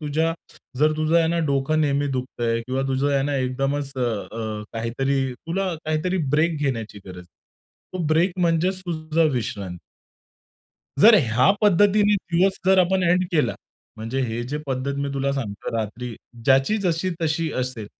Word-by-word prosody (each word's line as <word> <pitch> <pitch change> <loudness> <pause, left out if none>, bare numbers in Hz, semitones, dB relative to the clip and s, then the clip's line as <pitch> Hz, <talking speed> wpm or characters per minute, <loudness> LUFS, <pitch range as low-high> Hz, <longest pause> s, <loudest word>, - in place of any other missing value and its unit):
तुझ्या 160 +2 0 0.5
जर 155 +2 +4
तुझं 155 +2 +2
आहे 165 - +3
ना 170 +1 0
डोकं 140 +3 +1
नेहमी 145 -1 +1
दुखतंय 120 -2 -2
किंवा 130 +1 -1
तुझं 135 +2 +1
आहे 135 - +2
ना 145 +1 -1
एकदमच 135 +2 -1
अ, - - -2
अ, 110 -2 -3
काहीतरी 125 +4 -1
तुला 180 +9 -3 0.2
काहीतरी 155 +4 -1 0.2
ब्रेक 160 +2 +2
घेण्याची 115 -7 -3
गरज 90 -1 -9
आहे. 90 - -11 0.7
तो 185 - -5
ब्रेक 165 +4 +2
म्हणजेच 175 +3 +1
तुझी 160 -2 0
विश्रांती. 100 -8 -4 1.2
जर 225 +6 +9
ह्या 115 +3 +3
पद्धतीने 205 +1 +4 0.2
दिवस 190 +3 +3
जर 190 0 +5
आपण 185 +1 +3
एंड 180 +1 +3
केला. 155 -3 +2 0.4
म्हणजे 115 +5 -3
हे 120 -1 -2
जे 150 - -2
पद्धत 135 +1 -2
मी 140 0 -1
तुला 140 0 0
सांगतो 110 -7 -4
रात्री, 115 +2 -4 0.3
ज्याची 135 - +4
जशी-तशी 165 -3 -1
असेल, 125 -4 -4
140 Hz, 155 wpm, -23 LUFS, 125-165 Hz, 1.2 s, जर